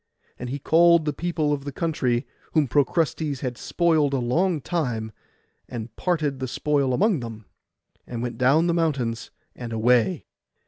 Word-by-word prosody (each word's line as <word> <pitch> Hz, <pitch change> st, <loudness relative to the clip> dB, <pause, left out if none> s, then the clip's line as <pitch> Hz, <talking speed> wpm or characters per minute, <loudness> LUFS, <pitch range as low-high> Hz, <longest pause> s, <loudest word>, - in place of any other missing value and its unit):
And 125 Hz, -, -5 dB
he 135 Hz, -, -3 dB
called 170 Hz, +2 st, +4 dB
the 150 Hz, -, 0 dB
people 155 Hz, -2 st, -1 dB
of 140 Hz, -1 st, -3 dB
the 140 Hz, -, -5 dB
country, 130 Hz, -5 st, -1 dB, 0.3 s
whom 155 Hz, -4 st, +3 dB
Procrustes 145 Hz, +1 st, 0 dB
had 125 Hz, -2 st, -3 dB
spoiled 155 Hz, 0 st, +1 dB
a -, -, +1 dB
long 160 Hz, +8 st, +1 dB
time, 125 Hz, -9 st, -2 dB, 0.6 s
and 115 Hz, -2 st, -7 dB
parted 155 Hz, -7 st, -1 dB
the 130 Hz, -, -3 dB
spoil 140 Hz, +1 st, 0 dB
among 200 Hz, -, +2 dB
them, 115 Hz, -3 st, -8 dB, 0.6 s
and 120 Hz, -1 st, -4 dB
went 120 Hz, -2 st, -5 dB
down 140 Hz, +6 st, +4 dB
the 170 Hz, -, +2 dB
mountains, 140 Hz, -9 st, -1 dB, 0.3 s
and 120 Hz, -2 st, -7 dB
away. 120 Hz, +8 st, +2 dB
140 Hz, 155 wpm, -24 LUFS, 120-160 Hz, 0.6 s, called